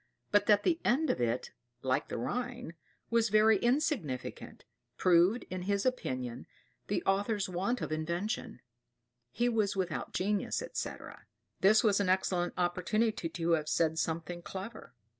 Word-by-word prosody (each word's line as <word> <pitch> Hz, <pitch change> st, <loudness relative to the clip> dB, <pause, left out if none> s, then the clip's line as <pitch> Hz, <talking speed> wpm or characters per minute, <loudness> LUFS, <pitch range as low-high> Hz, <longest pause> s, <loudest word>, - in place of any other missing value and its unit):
But 205 Hz, 0 st, +3 dB
that 205 Hz, -1 st, +5 dB
the 335 Hz, -2 st, +2 dB
end 285 Hz, +6 st, +2 dB
of -, -, -3 dB
it, 120 Hz, +1 st, -1 dB, 0.3 s
like 130 Hz, 0 st, 0 dB
the -, -, -4 dB
Rhine, 245 Hz, -, -3 dB, 0.4 s
was 230 Hz, -1 st, +3 dB
very 215 Hz, 0 st, +5 dB
insignificant, 235 Hz, -, -1 dB, 0.3 s
proved, 180 Hz, +6 st, +4 dB
in 185 Hz, 0 st, -3 dB
his 200 Hz, +2 st, 0 dB
opinion, 130 Hz, -, -2 dB, 0.4 s
the -, -, -1 dB
author's 200 Hz, +1 st, +1 dB
want 190 Hz, +7 st, -1 dB
of -, -, -3 dB
invention; 170 Hz, -, -3 dB, 0.7 s
he 240 Hz, -, 0 dB
was 220 Hz, -5 st, +1 dB
without 185 Hz, -4 st, -2 dB
genius, 205 Hz, -, -1 dB
etc. -, -, -6 dB, 0.3 s
This 210 Hz, +3 st, +5 dB
was 205 Hz, -3 st, +3 dB
an 200 Hz, -2 st, +1 dB
excellent 185 Hz, -1 st, +1 dB
opportunity 180 Hz, +2 st, 0 dB
to 165 Hz, +1 st, -2 dB
have 155 Hz, -2 st, +1 dB
said 160 Hz, -1 st, +1 dB
something 165 Hz, +2 st, -3 dB
clever. 195 Hz, -, -8 dB
195 Hz, 140 wpm, -32 LUFS, 170-220 Hz, 0.7 s, that